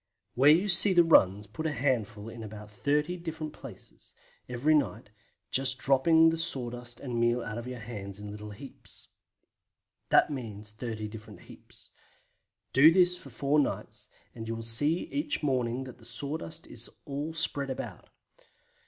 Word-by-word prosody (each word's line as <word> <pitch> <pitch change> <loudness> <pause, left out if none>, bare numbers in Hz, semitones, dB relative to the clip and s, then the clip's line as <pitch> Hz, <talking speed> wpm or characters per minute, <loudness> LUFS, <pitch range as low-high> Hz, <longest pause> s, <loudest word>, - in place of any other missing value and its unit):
Where 135 +4 +5
you 170 +7 +5
see 190 +1 +7
the 175 -1 +6
runs 105 - +4
put 155 +10 -5
a - - -1
handful 115 -6 -1
in 115 +1 -9
say 110 - -7
about 105 0 -10
30 150 +9 0
different 160 -3 -6
places, - - -13 0.3
every 125 +6 +1
night, 120 -8 0 0.4
just 130 -1 +1
dropping 160 +5 +4
the 165 - -3
sawdust 125 -6 -2
and 125 -4 -4
meal 120 +1 +1
out 105 +2 -5
of 120 - -8
your 125 0 -6
hands 105 -4 -8
in 105 0 -8
little 105 0 -8
heaps. 115 +6 -11 1.0
That - - +4
means 110 -6 -7
30 110 -1 -5
different 105 0 -11
heaps. - - -17 0.8
Do 145 +5 +8
this 180 0 +4
for 175 -6 -12
four 140 +4 +1
nights, 105 -4 -3 0.2
and 115 -1 -8
you 115 - -3
will 115 - -6
see 145 +9 +4
each 290 - -2
morning 130 -2 0
that 130 -1 -11
the 115 - -17
sawdust 150 +6 -4
is 120 0 -7 0.2
all 145 +3 -5
spread 140 -4 -1
about. 130 - -7
125 Hz, 165 wpm, -29 LUFS, 110-150 Hz, 1.0 s, Do